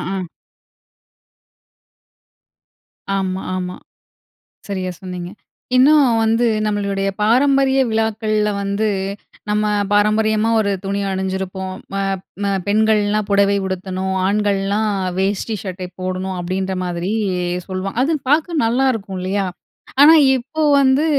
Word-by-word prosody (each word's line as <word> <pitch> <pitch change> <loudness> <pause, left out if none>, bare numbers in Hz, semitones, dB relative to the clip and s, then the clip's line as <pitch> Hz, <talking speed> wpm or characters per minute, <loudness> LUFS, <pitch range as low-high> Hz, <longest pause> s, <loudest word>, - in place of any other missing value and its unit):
ஆ. 185 -2 -4 2.9
ஆமா, 190 0 -2
ஆமா. 180 0 -4 0.9
சரியா 185 -2 -3
சொன்னீங்க. 180 -1 -6 0.5
இன்னும் 285 +1 +6
வந்து 225 +2 +2 0.2
நம்மளுடைய 200 -1 -1
பாரம்பரிய 270 +4 +3
விழாக்கள்ல 215 -1 0
வந்து, 200 +2 0 0.6
நம்ம 210 0 +1 0.3
பாரம்பரியமா 215 +1 +2
ஒரு 200 - 0
துணிய 200 +1 -2
அணிஞ்சிருப்போம். 190 0 -3 0.2
ம - - -2 0.5
ம 200 - +1 0.2
பெண்கள்லாம் 215 -1 +2
புடவை 200 0 +3
உடுத்தணும், 190 0 -3
ஆண்கள்லாம் 205 +1 +1 0.3
வேஷ்டி 200 +3 -1
சட்டை 185 -2 -6
போடணும் 185 0 -3
அப்டின்ற 185 +2 -2
மாதிரி 175 +3 -3 0.6
சொல்லுவாங் 190 +4 -4
அது 315 +5 +1 0.2
பாக்க 325 +3 +2
நல்லாருக்கும் 225 -5 0
இல்லையா? 195 +2 -1 0.6
ஆனா 310 +3 +9 0.2
இப்போ 300 +6 -4 0.2
வந்து 270 +3 +3
200 Hz, 100 wpm, -19 LUFS, 190-220 Hz, 2.9 s, ஆனா